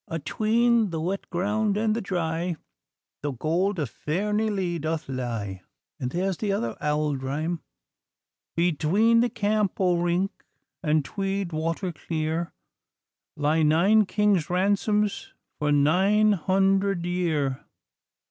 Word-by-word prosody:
'Atween 220 +7 +2
the 165 -2 -3
wet 185 +5 -3
ground 205 +3 0
and 215 0 +1
the 230 - -2
dry 175 -2 -2 0.7
The 145 -1 -2
gold 175 - 0
of 145 -8 -2
Fairnilee 195 0 -1
doth 160 +1 -3
lie.' 115 -7 -4 0.4
And 125 - -2
there's 185 +4 -1
the 210 -2 -1
other 115 - -1
auld 150 -2 0
rhyme 155 +5 -2 0.9
'Between 180 +7 +3
the 240 +1 +3
Camp 210 -3 0
o' 180 -2 +2
Rink 175 +3 +1 0.5
And 155 -4 +1
Tweed 195 -3 -3
water 165 +4 -2
clear, 160 +1 -3 0.9
Lie 150 +2 +2
nine 185 +8 +4
kings' 205 -7 +2
ransoms 205 +3 0 0.2
For 150 0 +1
nine 190 +9 +4
hundred 195 0 +1
year! 160 -7 -1
175 Hz, 120 wpm, -26 LUFS, 155-200 Hz, 0.9 s, nine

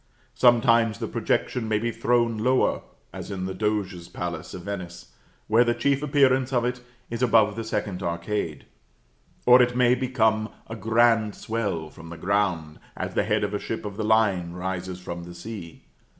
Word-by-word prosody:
Sometimes 115 -2 +4
the - - -4
projection 120 -3 -1
may 110 -1 +1
be 115 +2 -1
thrown 120 -1 +1
lower, 125 +4 +2 0.3
as - - -7
in 95 -2 -4
the 95 - -3
Doge's 95 -4 -2
palace 85 -2 -5
of 90 - -8
Venice, 90 -3 -7 0.3
where 115 +3 +5
the 120 -1 +1
chief 140 -1 +1
appearance 135 -3 +3
of 120 -2 +1
it 125 0 -2 0.3
is 115 +1 -4
above 110 -4 +4
the 115 - -4
second 105 -4 -3
arcade; 85 -2 -3 0.8
or 125 +1 +8
it 125 0 +2
may 125 -1 +5
become 110 -4 +1 0.2
a 115 - -7
grand 115 -1 +2
swell 100 -9 -3
from 80 0 -12
the 85 - -8
ground, 90 -4 -1 0.2
as - - -4
the - - +2
head - - +1
of 105 0 -2
a 105 - -1
ship 115 - -5
of 100 -1 -5
the 110 - -3
line 105 -6 +2
rises 90 0 -4
from 85 -1 -6
the 85 0 -10
sea. 85 -2 -9
110 Hz, 180 wpm, -25 LUFS, 90-120 Hz, 0.8 s, or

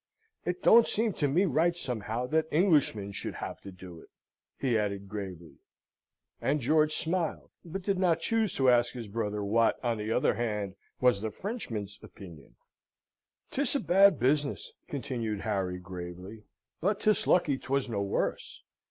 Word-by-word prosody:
"It 180 +1 -3
don't 230 0 +7
seem 220 -1 +1
to 145 - 0
me 170 +8 +3
right 170 +2 +2
somehow 120 -4 -3
that 160 +4 +1
Englishmen 150 - +2
should - - -5
have - - -6
to 100 - -9
do 90 -2 -11
it," - - -17 0.5
he 130 -4 0
added, 100 -2 -1
gravely. 90 -7 -7 0.8
And 150 +2 +1
George 155 +4 +2
smiled; 170 -1 -2
but 180 +3 -6
did 195 -1 0
not 170 -3 +3
choose 225 +2 0
to 130 -2 +4
ask 120 0 +3
his 120 -3 -6
brother 105 -1 -3
what, 115 +3 +2
on 115 -2 0
the 105 +1 -3
other - - +2
hand, 105 -4 -2 0.3
was 125 -5 +3
the 110 - -2
Frenchman's 110 - -5
opinion. 85 -7 -13 1.0
"'Tis 280 +1 0
a - - +2
bad 195 - +5
business," 140 +3 0 0.2
continued 120 -7 -3
Harry, 95 -4 -1
gravely; 90 +3 -8 0.3
"but 200 +4 0
'tis 215 -1 +2
lucky 150 -7 +3
'twas 135 +1 -1
no 105 -4 -2
worse. 100 0 -2
120 Hz, 160 wpm, -29 LUFS, 100-165 Hz, 1.0 s, don't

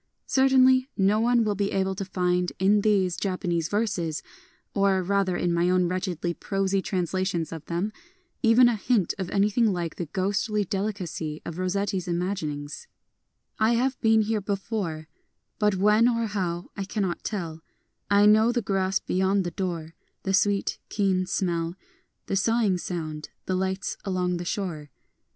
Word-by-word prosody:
Cer 265 0 +3
tainly 260 0 +5
no 200 +2 +3
one 235 0 +3
wiU 210 -1 0
be 200 0 -1
able 190 0 0
to 190 - -4
find 180 -1 0
in 200 +2 +3
these 195 -4 +2
Japanese 180 -4 -1
verses 190 -7 -1 0.2
— - - -36
or, 195 -2 +2
rather, 190 -1 +1
in 175 -1 0
my 170 +1 +2
own 180 -1 +3
wretchedly 180 -1 -2
prosy 195 +1 -1
translations 185 -2 -1
of 160 -2 -7
them 180 +6 -2 0.2
— 365 -1 -43
even 245 +2 +7
a 240 - +2
hint 215 -4 +1
of 185 -2 -3
anything 210 +3 +2
like 170 -3 -3
the 175 - -4
ghostly 200 +4 0
delicacy 185 -6 -3
of 170 +1 -6
Rossetti's 185 0 -1
imagining: 170 -5 -2 0.5
— - - -46
I - - +3
have 255 +2 0
been 220 -1 +4
here 215 0 -1
before, 195 -5 -3 0.3
— - - -51
But 210 -2 +3
when 210 +4 +4
or 230 -1 0
how 185 -4 -3
I 200 - -3
cannot 195 -3 -2
tell: 165 -6 -4 0.5
I 200 0 +5
know 215 +2 +6
the 240 -2 -1
grass 195 -1 +1
beyond 190 +1 +1
the 175 - -3
door, 165 -4 -4 0.3
The 190 - -1
sweet, 200 0 +1
keen 190 -3 +1
smell, 170 -3 -1 0.5
The - - -2
sighing 205 -2 +2
sound, 155 -4 -5 0.2
the 185 - -1
lights 190 +1 -2
along 180 -2 -1
the 175 - -5
shore. 170 -6 -3
190 Hz, 165 wpm, -26 LUFS, 175-210 Hz, 0.5 s, even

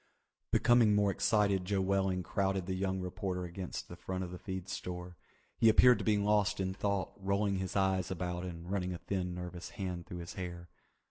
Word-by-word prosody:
Becoming 120 -3 +5
more 100 -1 +3
excited 100 -1 +2
Joe 100 +1 0
Welling 95 -1 +1
crowded 95 -1 0
the 95 - -2
young 95 0 -1
reporter 90 0 -3
against 90 +1 -6
the - - -9
front 95 0 -4
of 90 - -6
the 90 - -7
feed 95 -1 -5
store. 90 -2 -5 0.4
He 115 - +7
appeared 120 +1 +7
to - - -3
be 105 -1 +3
lost 105 0 +2
in 95 0 -1
thought, 100 -1 -1
rolling 100 0 0
his 95 +1 -4
eyes 95 -1 +2
about 90 -1 -3
and 85 0 -6
running 90 -2 -1
a - - -4
thin 90 -1 -3
nervous 90 0 -6
hand 90 -3 -4
through 90 - -6
his - - -8
hair. 85 -2 -6
95 Hz, 195 wpm, -33 LUFS, 90-100 Hz, 0.4 s, He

